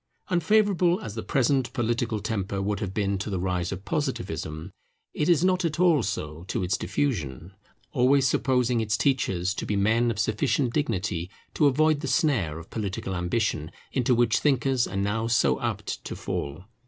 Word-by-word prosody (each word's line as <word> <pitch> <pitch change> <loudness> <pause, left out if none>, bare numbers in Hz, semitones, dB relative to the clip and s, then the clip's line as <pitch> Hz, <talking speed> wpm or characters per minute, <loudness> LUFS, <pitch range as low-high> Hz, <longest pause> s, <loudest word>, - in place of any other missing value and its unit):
Unfavourable 185 0 +3
as 105 - -6
the 110 - -4
present 135 0 +1
political 115 -3 -1
temper 100 -2 -2
would 100 +1 -1
have 100 -3 -3
been 100 -1 -1
to 100 - -4
the 95 -3 -2
rise 90 -1 -1
of 95 +1 -6
Positivism, 80 +4 -3 0.4
it 150 - 0
is 170 0 +4
not 185 0 +2
at 165 -1 -1
all 170 -6 +5
so 80 -6 -4
to 95 - -2
its 90 +5 +1
diffusion; 85 - -2 0.4
always 135 0 +4
supposing 125 -2 +1
its 105 -2 0
teachers 95 -10 +1
to - - -5
be 105 - -1
men 110 +4 +2
of 115 - -2
sufficient 120 +4 +1
dignity 95 - -1 0.2
to 150 - +4
avoid 155 +2 +3
the - - -4
snare 100 - +1
of 85 - -11
political 100 -3 -3
ambition 90 -3 -1 0.2
into 125 -1 +2
which 115 -1 +3
thinkers 135 -3 +2
are - - -7
now 105 +3 0
so 90 - +2
apt - - -3
to - - -6
fall. 70 +5 -4
110 Hz, 175 wpm, -26 LUFS, 95-135 Hz, 0.4 s, all